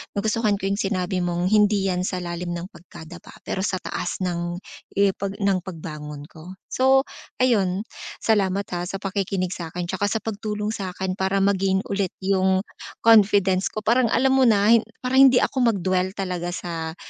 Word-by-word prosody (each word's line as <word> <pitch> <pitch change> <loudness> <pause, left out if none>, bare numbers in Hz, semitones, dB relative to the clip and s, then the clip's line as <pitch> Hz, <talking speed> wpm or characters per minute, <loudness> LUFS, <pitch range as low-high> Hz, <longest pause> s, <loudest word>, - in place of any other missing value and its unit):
nagustuhan 215 +1 +1
ko 195 0 -2
'yung 200 - -1
sinabi 185 -2 -1
mong 175 +1 -1
hindi 210 -2 +4
'yan 180 - -1
sa 180 -1 -3
lalim 175 0 -4
ng 175 +3 -7
pagkadapa 170 -1 -13
pero - - -3
sa 190 0 0
taas 185 0 -4
ng 175 -1 -2 0.4
ipag 200 0 +1
ng 200 -2 +1
pagbangon 150 -5 -8
ko. 175 +4 -11 0.2
So 265 +1 +4 0.4
ayun, 200 -6 +2 0.4
salamat, 200 -3 +2
ha, 175 0 -3
sa 195 - -5
pakikinig 195 -2 -2
sa'kin 175 0 -5
tsaka 190 +3 -1
sa 220 +1 -2
pagtulong 210 -1 -3
sa'kin 190 -3 -4
para 190 +1 +1
ma-gain 195 0 +1
ulit 195 -2 -1
'yung 190 0 +2 0.4
confidence 200 -4 +5
ko 215 - -6
parang 235 +3 +3
alam 260 +4 +2
mo 265 -1 +4
na, 210 -1 +4
hin 230 -2 +4 0.2
parang 265 +2 +6
hindi 250 -1 +4
ako 245 -5 +1
mag-dwell 185 0 -1
talaga 180 -2 -3
sa 165 -2 -5
190 Hz, 165 wpm, -23 LUFS, 180-210 Hz, 0.4 s, parang